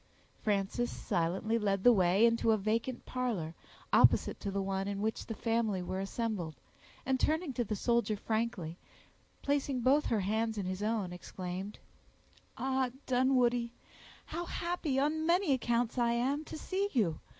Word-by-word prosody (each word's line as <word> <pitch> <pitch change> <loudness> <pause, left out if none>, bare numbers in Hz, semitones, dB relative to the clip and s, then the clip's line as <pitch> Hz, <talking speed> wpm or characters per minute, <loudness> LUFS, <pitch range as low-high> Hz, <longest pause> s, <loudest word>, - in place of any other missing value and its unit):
Frances 210 +3 0
silently 190 +7 -1
led 195 -2 0
the 245 - +8
way 190 +2 +4
into 230 0 +2
a - - +2
vacant 225 +4 -1
parlor, 225 -11 -2 0.4
opposite - - +5
to 200 - -3
the 200 0 -2
one 195 0 -1
in 200 -1 -3
which 220 +2 -2
the 225 - -4
family 225 -4 0
were 185 +1 -3
assembled, 195 -5 -3 0.5
and 265 0 +1
turning 315 0 +1
to 245 - 0
the 215 -1 -3
soldier 235 0 +1
frankly, 210 -7 -2 0.6
placing 280 -2 0
both 275 +5 +3
her 220 -3 +1
hands 220 +3 0
in 200 - -2
his 185 +1 -3
own, 210 -4 -1
exclaimed,— 185 +2 -6 0.8
"Ah, 265 -1 0 0.2
Dunwoodie! 245 -2 +2 0.5
how 345 - -4
happy, 340 -5 -2
on 310 +3 +1
many 345 -3 +3
accounts, 240 -1 0
I 235 -1 +3
am 270 +6 0
to - - -7
see 390 +5 -1
you! 180 - +1
230 Hz, 155 wpm, -32 LUFS, 195-260 Hz, 0.8 s, the